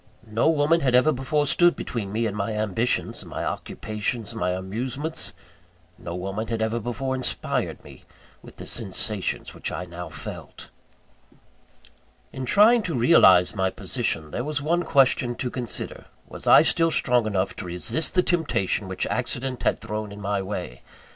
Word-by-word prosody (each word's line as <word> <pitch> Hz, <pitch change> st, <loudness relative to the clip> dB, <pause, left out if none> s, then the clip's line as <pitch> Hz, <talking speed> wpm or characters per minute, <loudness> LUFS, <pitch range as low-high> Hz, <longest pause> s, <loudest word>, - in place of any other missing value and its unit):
No 115 Hz, +7 st, +1 dB
woman 160 Hz, +1 st, +3 dB
had 130 Hz, -3 st, +2 dB
ever 130 Hz, +5 st, +5 dB
before 145 Hz, +2 st, 0 dB
stood 175 Hz, +5 st, +4 dB
between 105 Hz, -5 st, -4 dB
me 115 Hz, +2 st, 0 dB
and 105 Hz, -2 st, -2 dB
my 105 Hz, +1 st, -2 dB
ambitions, 110 Hz, +3 st, -1 dB
my -, -, -5 dB
occupations, 110 Hz, +1 st, -3 dB
my 90 Hz, -, -1 dB
amusements. 120 Hz, -, -3 dB, 0.7 s
No 85 Hz, -, -6 dB
woman 95 Hz, +5 st, -4 dB
had 115 Hz, 0 st, -2 dB
ever 110 Hz, +1 st, 0 dB
before 125 Hz, +4 st, -3 dB
inspired 130 Hz, -1 st, -1 dB
me -, -, -14 dB, 0.4 s
with -, -, -14 dB
the -, -, -9 dB
sensations 105 Hz, -2 st, -1 dB
which -, -, -4 dB
I 90 Hz, -, -4 dB
now 90 Hz, -1 st, -8 dB
felt. -, -, -9 dB, 1.6 s
In 130 Hz, -, -4 dB
trying 215 Hz, -, +5 dB
to 170 Hz, -9 st, -2 dB
realise 95 Hz, -, +6 dB
my 95 Hz, -2 st, 0 dB
position, 80 Hz, -4 st, -2 dB
there 120 Hz, -, -3 dB
was 150 Hz, +1 st, -3 dB
this 145 Hz, -, -2 dB
one 170 Hz, +3 st, +2 dB
question 130 Hz, -3 st, +3 dB
to 125 Hz, 0 st, -3 dB
consider; 125 Hz, -3 st, -4 dB, 0.2 s
was -, -, -7 dB
I -, -, +8 dB
still 165 Hz, 0 st, +3 dB
strong 125 Hz, -7 st, +2 dB
enough 100 Hz, -2 st, -1 dB
to -, -, -5 dB
resist 90 Hz, -, +1 dB
the 180 Hz, -, +4 dB
temptation 160 Hz, -, 0 dB
which -, -, -2 dB
accident 130 Hz, -1 st, -2 dB
had -, -, +1 dB
thrown 110 Hz, -2 st, -5 dB
in 100 Hz, -, -9 dB
my 100 Hz, -1 st, -1 dB
way? 95 Hz, -9 st, -6 dB
115 Hz, 165 wpm, -24 LUFS, 100-135 Hz, 1.6 s, I